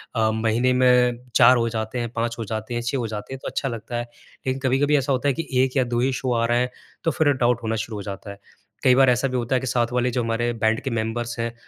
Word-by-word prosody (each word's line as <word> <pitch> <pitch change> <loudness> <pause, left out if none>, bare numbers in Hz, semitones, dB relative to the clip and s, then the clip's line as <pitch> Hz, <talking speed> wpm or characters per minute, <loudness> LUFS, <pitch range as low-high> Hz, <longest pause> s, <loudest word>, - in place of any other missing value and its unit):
अ, 110 -2 +2
महीने 115 +3 +1
में 125 -1 +4 0.2
4 125 +1 +7
हो 115 0 +1
जाते 110 +2 -3
हैं, 120 -1 -2
5 115 0 -2
हो 115 - -3
जाते 110 +2 -4
हैं, 120 - -1
6 120 +4 -2
हो 120 -3 -2
जाते 105 +3 -6
हैं 135 - -6
तो - - -4
अच्छा 135 - -2
लगता 115 0 -5
है। 120 - -1 0.4
लेकिन 130 0 -1
कभी-कभी 135 +3 +2
ऐसा 140 0 -1
होता 130 +1 0
है 140 - +3
कि 160 - -10 0.2
1 130 +1 -1
या 130 - +4
2 120 -1 -2
ही 130 +2 +2
शो 130 0 -1
आ 115 0 +1
रहा 120 +1 +2
हैं, 125 +1 +1 0.3
तो 165 - +2
फिर 155 -2 +2
डाउट 120 -2 +1
होना 110 0 -1
शुरू 110 -2 -7
हो - - -5
जाता 100 0 -7
है। 100 - -12 0.4
कई 130 -1 +6
बार 135 0 +5
ऐसा 125 +2 +2
भी 130 -1 -2
होता 120 +1 -1
है 130 - +1
कि 130 - -4
साथ 120 -1 +1
वाले 125 0 +1
जो 120 0 -1
हमारे 115 +1 0
बैंड 110 +1 +2
के 135 - -2
मेंबर्स 115 +1 -3
हैं 115 0 -2
120 Hz, 290 wpm, -23 LUFS, 115-130 Hz, 0.4 s, 4